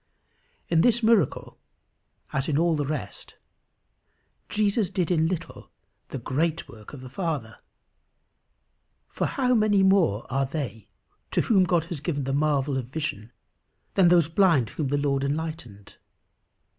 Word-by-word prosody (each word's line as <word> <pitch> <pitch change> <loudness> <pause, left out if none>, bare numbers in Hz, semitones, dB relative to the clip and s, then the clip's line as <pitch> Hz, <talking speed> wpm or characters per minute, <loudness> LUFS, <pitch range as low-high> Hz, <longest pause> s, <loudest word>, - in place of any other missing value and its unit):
In 165 -1 +3
this 240 +2 +3
miracle 220 -7 +1 0.7
as 135 +1 -1
in 145 - +1
all 170 0 +2
the 145 -2 -2
rest, 150 -2 -6 1.1
Jesus 210 -2 +1
did 185 -3 -1
in 160 -2 +2
little 180 -1 -6 0.4
the - - -5
great 155 +6 -1
work 110 -2 -13
of 140 - -9
the 130 - -9
Father; 145 - -4 1.5
for - - -2
how 255 -4 +1
many 215 -4 +3
more 190 - +3
are 135 +1 -1
they 130 -8 -5 0.4
to - - +1
whom 195 -5 +3
God 170 -3 +1
has 170 -3 -6
given 145 -4 -2
the 135 +1 -2
marvel 140 -1 +1
of 125 -3 -4
vision 130 -6 -5 0.6
than 190 -3 +4
those 170 -3 +5
blind 165 - +3
whom 150 - -3
the 145 +2 0
Lord 140 -1 0
enlightened! 140 -8 -5
155 Hz, 145 wpm, -25 LUFS, 135-180 Hz, 1.5 s, those